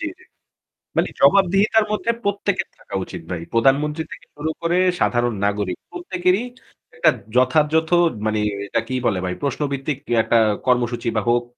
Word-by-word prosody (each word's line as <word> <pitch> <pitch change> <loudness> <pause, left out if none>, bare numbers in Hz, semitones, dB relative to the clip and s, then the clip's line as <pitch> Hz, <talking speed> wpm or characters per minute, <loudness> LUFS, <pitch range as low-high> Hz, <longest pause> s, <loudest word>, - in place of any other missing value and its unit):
জ্বী, 335 - -2
জ্বী। 370 - -19 0.7
মানে - - +2
জবাবদিহিতার 200 +3 +4
মধ্যে 215 +2 0
প্রত্যেকের 200 -1 -1
থাকা 100 - -9
উচিত 90 -2 -8
ভাই। 85 - -3
প্রধানমন্ত্রী 145 +6 +2
থেকে - - -10
শুরু 150 +2 -2
করে 170 +1 +1 0.2
সাধারণ 120 -1 +1
নাগরিক। 100 -3 -1
প্রত্যেকেরই 195 - 0 0.5
একটা - - +4 0.3
যথাযথ 150 +5 +3 0.4
মানি 110 0 0 0.3
এটা - - 0
কি 130 - -3
বলে 100 -6 +1
ভাই 90 - -2
প্রশ্নভিত্তিক 140 0 -2 0.3
একটা 115 - +2 0.3
কর্মসূচি 120 -2 +1
বা 110 - +2
হোক 120 0 +3
140 Hz, 145 wpm, -21 LUFS, 120-180 Hz, 0.7 s, জবাবদিহিতার